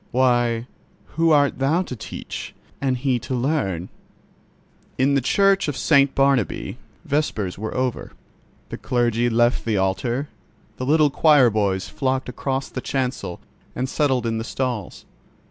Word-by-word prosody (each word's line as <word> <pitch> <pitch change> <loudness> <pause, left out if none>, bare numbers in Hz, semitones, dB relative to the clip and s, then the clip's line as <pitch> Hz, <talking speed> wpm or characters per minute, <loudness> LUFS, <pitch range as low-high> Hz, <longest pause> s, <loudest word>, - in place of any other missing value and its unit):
Why, 120 -2 +2 0.5
who 165 +1 +2
art 145 -3 +3
thou 155 +7 +2
to 130 - -7
teach - - -7 0.3
and 130 -2 +1
He 130 -1 0
to 120 +3 -4
learn?" 120 - -1 1.1
In 135 +2 +3
the 140 - +3
Church 195 +8 +3
of 145 -3 -3
St. 140 -3 +3
Barnabķ 135 -5 +1 0.3
vespers 110 -11 -1
were 110 +1 -4
over; 130 -1 -2 0.6
the - - -6
clergy 120 -1 +1
left 120 +1 +2
the 110 -3 0
altar; 115 +9 -1 0.5
the 130 - -4
little 150 -1 +4
choir 145 -5 +5
boys 100 -3 0
flocked 130 -1 -2
across 135 +2 -3
the 130 - -6
chancel 130 -10 -3 0.3
and 130 +2 -1
settled 130 -4 0
in 115 -1 -1
the - - -3
stalls. 120 -5 -4
130 Hz, 145 wpm, -22 LUFS, 115-140 Hz, 1.1 s, choir